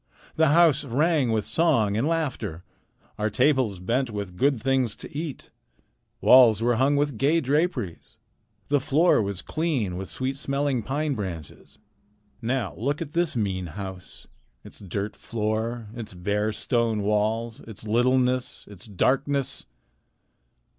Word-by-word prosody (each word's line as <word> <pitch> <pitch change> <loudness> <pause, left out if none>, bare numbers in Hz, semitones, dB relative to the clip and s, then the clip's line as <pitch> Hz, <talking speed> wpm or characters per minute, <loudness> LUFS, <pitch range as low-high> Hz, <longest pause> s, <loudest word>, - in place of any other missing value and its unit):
The 160 0 +4
house 155 -1 +4
rang 140 0 +1
with 110 -3 0
song 115 -5 +2
and 115 +7 +1
laughter. 130 - -2 0.6
Our 105 +1 +1
tables 125 -3 +2
bent 120 +8 -1
with 100 -4 -5
good 135 +4 +2
things 130 -2 +1
to - - -11
eat. 150 -2 -6 0.7
Walls 120 -5 +7
were 120 0 +1
hung 135 +3 +3
with 145 -5 0
gay 150 +5 +3
draperies. 145 - -2 0.5
The 145 0 +3
floor 150 +2 +3
was 100 -2 -4
clean 135 - -1
with 95 0 -6
sweet 130 +1 -3
smelling 140 -2 -1
pine 145 +6 -1
branches. 90 - -7 0.6
Now 115 - -1
look 140 +7 -1
at 155 -3 -6
this 170 -3 0
mean 95 -5 -1
house; 95 -2 -8 0.4
its - - -13
dirt 100 +2 -4
floor, 110 +1 -3
its 110 -5 -7
bare 105 +4 -1
stone 115 -1 0
walls, 110 +2 0
its 110 -1 -11
littleness, 125 +3 +1
its 100 0 -13
darkness! 135 +6 0
120 Hz, 135 wpm, -25 LUFS, 105-140 Hz, 0.7 s, Walls